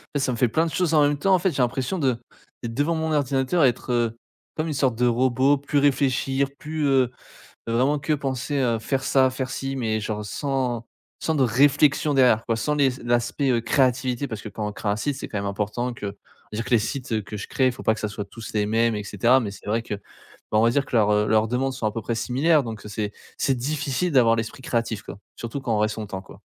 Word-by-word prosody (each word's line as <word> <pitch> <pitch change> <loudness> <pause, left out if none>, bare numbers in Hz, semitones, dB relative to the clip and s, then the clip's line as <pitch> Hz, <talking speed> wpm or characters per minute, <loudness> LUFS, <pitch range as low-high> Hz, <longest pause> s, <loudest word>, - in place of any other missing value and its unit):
fait - - +2
ça 130 -1 0
me 120 - -3
fait 125 0 +3
plein 160 +9 +1
de 165 - -3
choses 175 -3 +1
en 150 - +6
même 145 0 +2
temps 195 +6 +2
en - - +2
fait 185 0 +1
j'ai 135 - -1
l'impression 130 +8 -1
de 130 -5 +1 0.5
d'être 115 -1 -4
devant 145 +6 +1
mon 160 0 -1
ordinateur 140 +2 +1
être, 125 0 0
heu, 115 -1 0 0.4
comme 155 +1 -2
une 155 - -2
sorte 130 -4 +1
de 125 +1 +1
robot, 130 +3 +3
plus 145 +1 -2
réfléchir, 135 -1 +2
plus, 155 0 -3
heu 130 -3 +3 0.6
heu, - - -1
vraiment 135 +5 +2
que 140 +2 -1
penser 135 0 -2
à 120 -3 +1
faire 135 +4 -2
ça, 130 -1 +4
faire 130 0 -4
ci, 135 0 -3
mais 110 -3 -1
genre 105 0 -3
sans 125 0 -2 0.3
sans 160 - 0
de 140 - +2
réflexion 145 +4 +3
derrière 125 -4 +4
quoi 115 -1 +1
sans 150 +6 0
les 140 -2 +4
s 130 0 -2
l'aspect 120 +1 +1
créativité 130 0 +1
parce 110 -4 -6
que 110 - -6
quand 105 +1 -4
on 105 - -4
crée 105 - -5
un 100 - +1
site, 140 +6 -2
c'est - - -6
quand 105 - -3
même 100 - -3
important 105 +5 -2
que 105 -3 -6 0.4
je 105 - -5
veux - - 0
dire - - -11
que - - -7
les 120 - +5
sites 120 -2 -2
que 105 +1 -7
je 100 - -6
crée 130 - +1
il 130 - +3
faut 130 - -10
pas 110 - +3
que - - -8
ça 105 - -1
soit 105 0 -5
tous 110 +3 -9
les 105 -1 +1
mêmes 115 +2 +2
et 105 - -4
cetera. 120 +7 +3
Mais 105 - -3
c'est - - -13
vrai 110 +3 +1
que, 110 - -4
ben 100 - -8 0.6
on - - +4
va 115 - +5
dire 140 +3 +1
que 125 - -4
leurs, 105 -2 +4
heu, 105 0 +2
leurs 110 0 +3
demandes 130 +2 0
sont 125 -4 -4
à - - -1
peu 115 +1 -4
près 115 +2 -2
similaires 145 +6 +2
donc 110 -3 -7
heu, 105 - -7
c'est 105 0 -3 0.3
c'est 135 - +1
difficile 145 +4 -1
d'avoir 115 -4 +5
l'esprit 115 +3 -4
créatif 115 -4 -1
quoi, - - -9 0.2
surtout 115 +4 -5
quand 120 -4 -1
on 105 - +1
reste 105 0 +1
longtemps 100 -3 -5
quoi. - - -15
125 Hz, 265 wpm, -24 LUFS, 110-140 Hz, 0.6 s, en